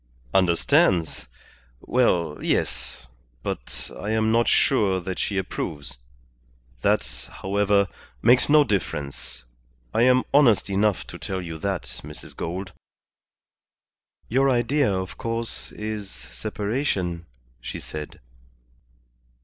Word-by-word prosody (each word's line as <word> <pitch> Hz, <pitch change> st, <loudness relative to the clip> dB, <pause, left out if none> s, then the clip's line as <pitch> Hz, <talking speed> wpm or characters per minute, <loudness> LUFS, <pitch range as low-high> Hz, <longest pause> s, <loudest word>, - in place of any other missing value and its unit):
"Understands? 85 Hz, -4 st, +3 dB, 0.5 s
Well, 90 Hz, -11 st, +1 dB
yes. -, -, -2 dB, 0.4 s
But -, -, -6 dB
I 105 Hz, -, -5 dB
am 110 Hz, 0 st, +2 dB
not 115 Hz, +1 st, +3 dB
sure 100 Hz, -8 st, +3 dB
that 90 Hz, 0 st, -5 dB
she 100 Hz, -, -1 dB
approves. 80 Hz, -8 st, -4 dB, 0.8 s
That, -, -, 0 dB
however, 100 Hz, +1 st, +3 dB, 0.3 s
makes 125 Hz, -, +5 dB
no 150 Hz, 0 st, +7 dB
difference. 75 Hz, -, -3 dB, 0.5 s
I -, -, +2 dB
am 125 Hz, +1 st, +5 dB
honest 115 Hz, -9 st, +5 dB
enough 100 Hz, 0 st, +2 dB
to -, -, -10 dB
tell 95 Hz, -, -3 dB
you 85 Hz, -3 st, -6 dB
that, 95 Hz, -1 st, -1 dB, 0.2 s
Mrs. 75 Hz, +1 st, -10 dB
Gould." 95 Hz, +3 st, -4 dB, 1.5 s
"Your 135 Hz, +4 st, +3 dB
idea, 130 Hz, 0 st, +2 dB
of 95 Hz, -1 st, -3 dB
course, 115 Hz, 0 st, -3 dB
is 105 Hz, -2 st, -5 dB
separation," 90 Hz, -, -3 dB, 0.3 s
she -, -, -5 dB
said. 75 Hz, -1 st, -7 dB
100 Hz, 105 wpm, -25 LUFS, 85-115 Hz, 1.5 s, no